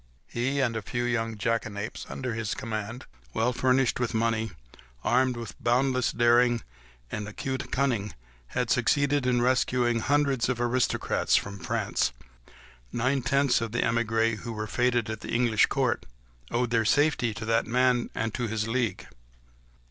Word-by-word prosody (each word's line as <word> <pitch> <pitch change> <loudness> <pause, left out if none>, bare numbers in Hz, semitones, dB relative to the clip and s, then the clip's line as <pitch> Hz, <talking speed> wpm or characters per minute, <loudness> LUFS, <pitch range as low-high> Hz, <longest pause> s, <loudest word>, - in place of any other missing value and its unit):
He 130 +4 -1
and 120 -3 +1
the 110 - -3
few 120 +4 -3
young 115 -2 -1
jackanapes 110 -1 -2
under 130 -3 -4
his 110 -2 -2
command, 110 +2 -5 0.3
well 125 +3 +1
furnished 125 0 +2
with 120 -1 -1
money, 110 0 +1 0.5
armed 125 0 +2
with 115 -3 -6
boundless 130 +1 +2
daring, 120 -1 +3 0.5
and 105 -1 -4
acute 130 +5 -4
cunning, 120 -8 0 0.3
had - - -1
succeeded 145 -2 +2
in 120 -1 +2
rescuing 125 -2 +2
hundreds 140 -2 +1
of 125 -2 -1
aristocrats 120 +1 +1
from 100 0 -1
France. 75 - -1 0.8
Nine 130 +3 +1
tenths 135 0 +2
of 115 -1 -4
the 120 - +1
émigrés, 115 -1 +1
who 115 -1 -6
were 110 0 -3
fêted 120 0 +1
at 110 -1 -4
the - - -9
English 115 -2 +3
court, - - 0 0.4
owed 120 0 0
their 115 -1 +3
safety 145 -1 +2
to 110 - -5
that 115 0 +1
man 125 0 +2
and 110 -1 -2
to 120 -2 -2
his 110 0 -2
league. 120 -1 -1
120 Hz, 155 wpm, -27 LUFS, 115-125 Hz, 0.8 s, daring